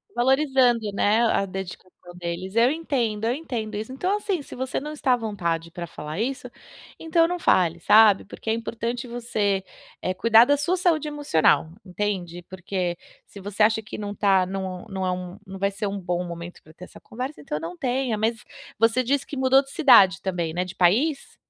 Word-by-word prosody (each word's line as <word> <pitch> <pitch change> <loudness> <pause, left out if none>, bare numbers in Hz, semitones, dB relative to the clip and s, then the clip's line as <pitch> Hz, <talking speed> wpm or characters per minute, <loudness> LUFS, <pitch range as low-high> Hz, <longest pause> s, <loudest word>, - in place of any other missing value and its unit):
Valorizando, 255 -4 +2
né, 205 +3 +2
a 200 - +1
dedicação 185 -1 -7 0.3
deles. 180 +3 -5
Eu 235 +3 +4
entendo, 245 -9 -2
eu 235 - +1
entendo 240 -8 -5
isso. 215 +5 -5
Então, 370 +9 0
assim, 395 -5 -2
se - - -11
você 260 +1 -3
não 300 +2 -6
está 285 -4 +1
à - - +2
vontade 170 -7 -3
para 170 +1 -6
falar 155 0 -7
isso, 260 +4 -3 0.5
então, 330 +1 +2
não 355 +1 -2
fale, 175 - +2
sabe. 210 +2 +5
Porque 205 - -8
é - - +3
importante 235 +2 -4
você, 215 -5 -1 0.4
eh, 185 - -1
cuidar 230 +3 +6
da 285 +2 +3
sua 315 +6 0
saúde 340 -4 +1
emocional, 165 - +2 0.2
entende? 180 -3 -3
Porque, 185 -1 -3 0.3
se 200 - -12
você 205 +2 -5
acha 220 +1 +4
que 215 - -8
não 205 -1 -5
tá 195 -3 +3
não 190 -1 -5
não 190 -1 -3
é 185 - 0
um 180 0 -6
não 190 -1 -9
vai 200 +1 +1
ser 200 +1 -5
um 200 0 -3
bom 180 -1 -2
momento 170 0 -8
para 155 - -17
ter 180 - -11
essa - - -15
conversa, 255 +6 -7
então, 150 +1 -4
eu - - -7
não 170 +2 -7
tenha. 250 -1 -1
Mas 225 +1 -1 0.4
você 230 +3 +3
disse 275 +3 0
que 285 - -6
mudou 265 +1 +4
de 270 - -15
cidade 235 - +5
também, 175 -4 -2
né? 180 +2 -1
De 185 +1 -9
país? 255 - +1
215 Hz, 200 wpm, -24 LUFS, 185-260 Hz, 0.5 s, cuidar